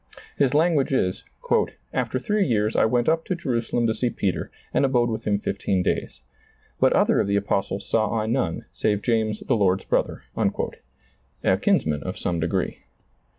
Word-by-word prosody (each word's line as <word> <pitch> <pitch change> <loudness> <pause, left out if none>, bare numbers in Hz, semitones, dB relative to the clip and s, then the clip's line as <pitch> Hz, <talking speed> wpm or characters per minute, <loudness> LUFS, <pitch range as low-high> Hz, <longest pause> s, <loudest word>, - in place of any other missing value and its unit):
His 140 0 +2
language 155 -3 +3
is: 95 -8 0 0.7
"After - - -1
three 205 +10 +1
years 110 -3 +1
I - - +4
went 120 +2 +1
up 160 +1 +2
to 185 - -1
Jerusalem 120 -6 -1
to 110 - +2
see 120 +2 0
Peter, 100 -4 -2 0.2
and - - +3
abode 120 -3 +2
with 110 - -4
him 100 -1 +2
fifteen 100 -2 -1
days. 65 - -2 0.6
But - - +4
other - - +3
of - - +1
the 100 - +1
apostles 100 -1 -1
saw 110 -1 +1
I 110 - -1
none, 115 -7 -1
save 105 -1 0
James 110 -3 0
the 130 - +1
Lord's 95 -3 +2
brother," - - 0
a - - -3
kinsman 75 -2 +1
of - - -5
some 85 -2 -2
degree. 85 +3 -1
110 Hz, 170 wpm, -24 LUFS, 100-130 Hz, 0.7 s, I